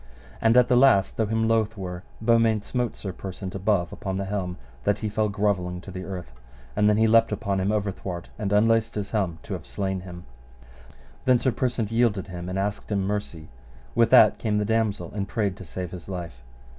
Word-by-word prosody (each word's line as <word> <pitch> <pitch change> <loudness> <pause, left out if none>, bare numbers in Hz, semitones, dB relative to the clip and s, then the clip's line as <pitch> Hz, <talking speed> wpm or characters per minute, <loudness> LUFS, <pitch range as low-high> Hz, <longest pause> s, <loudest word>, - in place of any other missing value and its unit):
And 115 +2 +4
at 125 -1 +6
the 125 - +3
last, 120 -7 +5
though 110 - +1
him 110 +1 +1
loath 110 -1 +1
were, 90 -2 -5 0.2
Beaumains 115 -2 +3
smote 125 -2 -2
Sir 95 -3 -5
Persant 95 +1 -7
above 95 -3 0
upon 95 -1 -4
the 100 - -2
helm, 95 -3 -3 0.3
that 105 - +2
he 110 - -3
fell 105 +1 0
grovelling 100 -4 0
to 95 - -10
the 95 0 -6
earth; 90 -9 -6 0.4
and 105 0 +4
then 105 - +3
he 110 - +4
leapt 115 +1 +5
upon 100 -3 -1
him 95 +1 0
overthwart 95 -4 -3
and 100 -2 -2
unlaced 115 +2 +3
his 100 -1 -4
helm 95 -7 0
to - - -6
have - - -6
slain 95 -1 -2
him. 90 -1 -10 1.0
Then 130 -1 +5
Sir 130 +2 +1
Persant 120 -4 -1
yielded 115 -5 +1
him 90 0 -6
and 90 - -3
asked 100 +2 -3
him 100 -2 +1
mercy. 95 -6 -4 0.4
With 115 +7 +4
that 105 - +7
came 105 -2 0
the 105 - +1
damosel 110 -5 0
and 100 -1 -3
prayed 100 -3 -1
to - - -9
save 90 +2 -6
his 90 0 -9
life. 85 -9 -6
100 Hz, 205 wpm, -25 LUFS, 95-110 Hz, 1.0 s, that